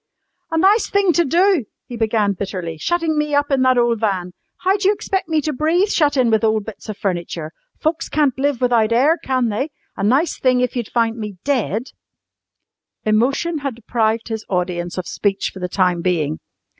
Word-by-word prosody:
] - - -52
"A 325 - 0
nice 395 +6 +4
thing 400 -3 +3
to 345 - +3
do!" 345 - +3 0.2
he 245 - -8
began 220 -3 +1
bitterly. 185 -4 -5
"Shuttin' 335 - 0
me 300 -1 0
up 290 0 +1
in 270 -1 +2
that 255 -1 +4
ole 240 -1 +3
van. 195 -5 -1 0.3
How 380 +1 +3
d'you 400 -1 +2
expect 385 -4 -2
me 315 -1 +2
to 305 +1 -2
breathe, 330 +8 +2
shut 290 -7 +2
in 245 -3 +3
with 220 0 +2
ole 220 0 +3
bits 215 +1 -10
of 210 - -5
furniture. 170 -4 -3 0.3
Folks 320 +1 -1
can't 290 -3 +2
live 280 -2 0
without 235 -3 +3
air, 285 +8 +3
can 255 -3 +1
they? 260 +8 -2 0.3
A - - -4
nice 265 +11 +2
thing 255 -1 +3
if 250 0 0
you'd 240 -4 -3
found 230 -1 0
me 210 -3 -6
dead!" 250 -4 -1 1.1
Emotion 270 +10 +1
had 275 -4 -4
deprived 225 -1 -1
his 220 -1 -4
audience 180 -1 -2
of 185 - -3
speech 200 -1 -1
for 190 - -9
the 180 0 -3
time 180 -2 +1
being. 160 -4 0
240 Hz, 195 wpm, -20 LUFS, 205-300 Hz, 1.1 s, nice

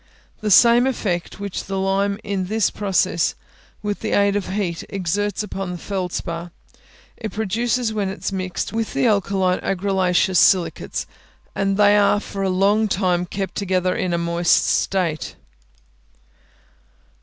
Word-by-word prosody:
The 215 - -2
same 235 +5 +6
effect 190 -9 -2
which 200 -2 -5
the 195 0 -3
lime 195 +1 0
in 200 -3 -2
this 215 +2 +1
process, 190 -4 0 0.5
with 205 -1 -2
the - - -3
aid 200 0 +3
of 205 -2 -2
heat, 185 -4 -2
exerts 200 +3 -1
upon 195 -2 -5
the 180 - -5
feldspar, 175 -2 -4 0.7
it 220 -3 -5
produces 225 +3 -1
when 205 -3 -1
it 195 - -6
is - - -1
mixed 185 0 -3
with 225 -1 -2
the - - +2
alkaline 195 -4 +1
argillaceous 190 -1 +1
silicates, 185 -3 +2 0.5
and 195 0 0
they 205 0 +5
are 205 0 +4
for 200 -1 -6
a 195 - +1
long 200 +4 +2
time 180 -3 0
kept 195 0 -4
together 185 -2 0
in 185 - -1
a 170 - +1
moist 170 0 +2
state. 175 -5 0
195 Hz, 145 wpm, -21 LUFS, 185-205 Hz, 0.7 s, same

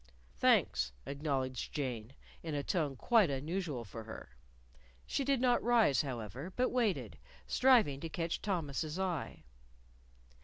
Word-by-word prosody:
"Thanks," - - +3
acknowledged 135 -3 -2
Jane, 125 -5 -3 0.3
in 160 -3 -4
a 145 - -1
tone 150 -7 0
quite 215 - +4
unusual 145 -2 -3
for 110 +2 -8
her. 110 - -10 0.7
She 275 - -1
did 275 -1 +2
not 245 -1 +3
rise, 230 - +4
however, 130 - -5
but 255 +1 +2
waited, 235 -6 0 0.3
striving 235 - +4
to 165 - -5
catch 165 +1 -2
Thomas's 160 -5 -2
eye. 180 -6 -3
155 Hz, 125 wpm, -34 LUFS, 135-200 Hz, 0.7 s, quite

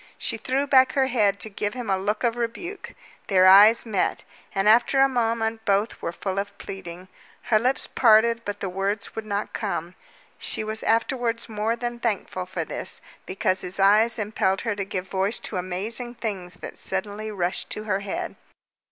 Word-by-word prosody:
She - - -1
threw 270 +2 -1
back 260 -2 +5
her 270 -1 +3
head 210 -6 +2
to - - -1
give 205 +2 -3
him 245 -2 -5
a 195 - +2
look 205 +5 -2
of 235 -1 +2
rebuke. 240 - -5 0.3
Their 185 -2 +5
eyes 205 +5 +8
met, 205 -5 -1 0.3
and 195 +1 +1
after 240 +5 +5
a 270 - +7
moment 225 -3 -1
both 205 +1 0
were - - -2
full 190 +2 -3
of 200 0 -5
pleading. 180 -1 -8 0.5
Her 215 - +7
lips 255 +4 0
parted, 230 0 +4
but 205 -1 -5
the 195 - -1
words 195 +3 -3
would 220 -1 -5
not 205 0 -3
come. 180 -5 -3 0.5
She - - -2
was 220 +1 -4
afterwards 230 +1 0
more 220 +1 -1
than 240 0 -4
thankful 200 -5 -2
for 185 - -3
this, - - -2 0.3
because 185 0 0
his 180 +2 -5
eyes 215 +4 +4
impelled 205 -3 0
her 225 -3 -1
to 200 -1 -3
give 190 -2 -4
voice 195 +4 0
to 200 - -5
amazing 210 +7 -4
things 195 -7 -5
that - - -8
suddenly 205 +3 -4
rushed 185 -4 -2
to 215 - -4
her 200 -3 0
head. 200 -1 -4
210 Hz, 185 wpm, -25 LUFS, 195-230 Hz, 0.5 s, eyes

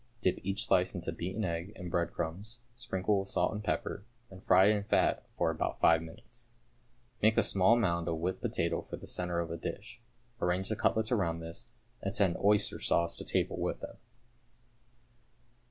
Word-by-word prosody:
Dip 95 -3 +1
each 95 +1 -2
slice 90 +2 +2
into 85 -2 -3
beaten 95 +6 -3
egg 85 +4 -3
and 90 -4 -7
breadcrumbs, 85 +6 -2 0.2
sprinkle 105 -5 0
with 95 0 -4
salt - - +1
and 105 0 -5
pepper, 100 - -2 0.3
and 95 0 -12
fry 95 +1 +6
in 105 -1 +2
fat 100 - +1
for - - +2
about - - -2
five 80 0 +5
minutes. 115 +8 -12 0.7
Make 110 +1 +4
a - - +6
small 95 +4 +4
mound 85 -6 0
of 80 -1 -1
whipped 90 +3 -2
potato - - 0
for - - -8
the - - -11
centre 90 -1 -2
of 85 -1 -3
a 85 - -3
dish, 105 +7 -7 0.4
arrange 90 +2 0
the 110 - 0
cutlets 110 +1 +1
round 85 -8 +1
this, 85 0 -8 0.3
and 100 - -3
send 95 -5 +3
oyster 105 +1 +2
sauce 85 0 +1
to - - -6
table - - -1
with - - -2
them. - - -8
95 Hz, 180 wpm, -32 LUFS, 85-105 Hz, 0.7 s, fry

